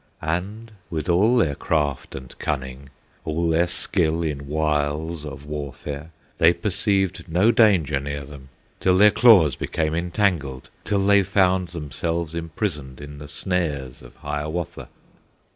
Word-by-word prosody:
And 100 Hz, +8 st, -3 dB, 0.2 s
with 80 Hz, +1 st, -4 dB
all 105 Hz, +8 st, +4 dB
their 80 Hz, -11 st, +2 dB
craft 75 Hz, -2 st, -1 dB
and 65 Hz, -1 st, -9 dB
cunning, 65 Hz, -2 st, -4 dB, 0.3 s
All 85 Hz, +2 st, -1 dB
their 85 Hz, +2 st, +3 dB
skill 85 Hz, -2 st, 0 dB
in 70 Hz, -3 st, -3 dB
wiles 75 Hz, +1 st, -1 dB
of 70 Hz, 0 st, -9 dB
warfare, 75 Hz, 0 st, -6 dB, 0.3 s
They 85 Hz, 0 st, +6 dB
perceived 95 Hz, 0 st, 0 dB
no 95 Hz, +8 st, +4 dB
danger 95 Hz, -11 st, +3 dB
near 70 Hz, 0 st, -5 dB
them, 70 Hz, -1 st, -12 dB, 0.3 s
Till 90 Hz, -1 st, +3 dB
their 105 Hz, +2 st, +7 dB
claws 100 Hz, -, +6 dB
became 80 Hz, -1 st, -2 dB
entangled, 85 Hz, -6 st, -1 dB
Till 100 Hz, -2 st, +1 dB
they 100 Hz, 0 st, +6 dB
found 95 Hz, -1 st, +2 dB
themselves 85 Hz, +1 st, -3 dB
imprisoned 80 Hz, -, -4 dB
In 75 Hz, 0 st, -9 dB
the 75 Hz, -, -9 dB
snares 75 Hz, -6 st, -2 dB
of -, -, -15 dB
Hiawatha. 75 Hz, +3 st, -4 dB
80 Hz, 135 wpm, -23 LUFS, 75-90 Hz, 0.3 s, their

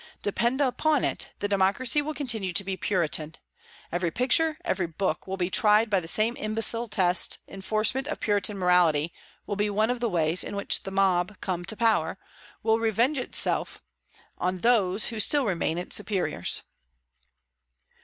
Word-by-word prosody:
Depend 235 Hz, +6 st, 0 dB
upon 285 Hz, +2 st, +1 dB
it, -, -, -2 dB
the 205 Hz, -, 0 dB
democracy 205 Hz, +8 st, +1 dB
will 305 Hz, +1 st, -5 dB
continue 225 Hz, -10 st, -1 dB
to 200 Hz, -, +1 dB
be 190 Hz, 0 st, -3 dB
Puritan. 165 Hz, -5 st, -1 dB, 0.6 s
Every 175 Hz, 0 st, -1 dB
picture, 310 Hz, -, +2 dB
every 190 Hz, -, -1 dB
book, 165 Hz, 0 st, -3 dB
will 190 Hz, 0 st, -4 dB
be 180 Hz, 0 st, -2 dB
tried 215 Hz, +2 st, +3 dB
by 195 Hz, -, +3 dB
the 165 Hz, -, -9 dB
same 220 Hz, +7 st, +2 dB
imbecile 225 Hz, +2 st, +2 dB
test. 185 Hz, -3 st, +2 dB
Enforcement 215 Hz, +7 st, -1 dB
of 310 Hz, -, -4 dB
Puritan 205 Hz, -1 st, 0 dB
morality 170 Hz, -4 st, +2 dB, 0.3 s
will 205 Hz, -, -3 dB
be 210 Hz, +1 st, 0 dB
one 215 Hz, +3 st, +1 dB
of 250 Hz, -, -3 dB
the 235 Hz, -1 st, -1 dB
ways 165 Hz, -1 st, +1 dB
in -, -, -6 dB
which 200 Hz, -, 0 dB
the -, -, -7 dB
mob, 190 Hz, 0 st, 0 dB
come 180 Hz, -2 st, -3 dB
to 220 Hz, -, -1 dB
power, 215 Hz, -7 st, +1 dB, 0.5 s
will 220 Hz, 0 st, +2 dB
revenge 230 Hz, +6 st, +1 dB
itself 250 Hz, -, -1 dB, 0.6 s
on 185 Hz, 0 st, -2 dB
those 215 Hz, -4 st, +2 dB
who 225 Hz, -2 st, -6 dB
still 285 Hz, +5 st, +2 dB
remain 170 Hz, -4 st, -1 dB
its 175 Hz, -, -2 dB
superiors." 205 Hz, -3 st, -1 dB
205 Hz, 165 wpm, -26 LUFS, 180-230 Hz, 0.6 s, tried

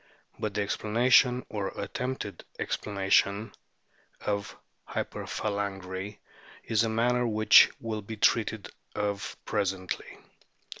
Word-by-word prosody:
But 105 Hz, -2 st, -3 dB
the 105 Hz, -, +1 dB
explanation, 125 Hz, +5 st, +3 dB
or 105 Hz, -3 st, -3 dB
attempted 125 Hz, 0 st, -4 dB
explanation, 100 Hz, +1 st, +1 dB, 0.7 s
of 100 Hz, -1 st, -2 dB, 0.3 s
hyperphalangy 100 Hz, -1 st, -3 dB, 0.5 s
is 110 Hz, 0 st, +2 dB
a 115 Hz, -, 0 dB
matter 120 Hz, +2 st, +2 dB
which 110 Hz, -1 st, +7 dB
will 110 Hz, -2 st, -3 dB
be 110 Hz, +2 st, -7 dB
treated 110 Hz, -1 st, +1 dB, 0.2 s
of 100 Hz, -1 st, -2 dB
presently. 95 Hz, -3 st, -2 dB
105 Hz, 95 wpm, -29 LUFS, 100-115 Hz, 0.7 s, which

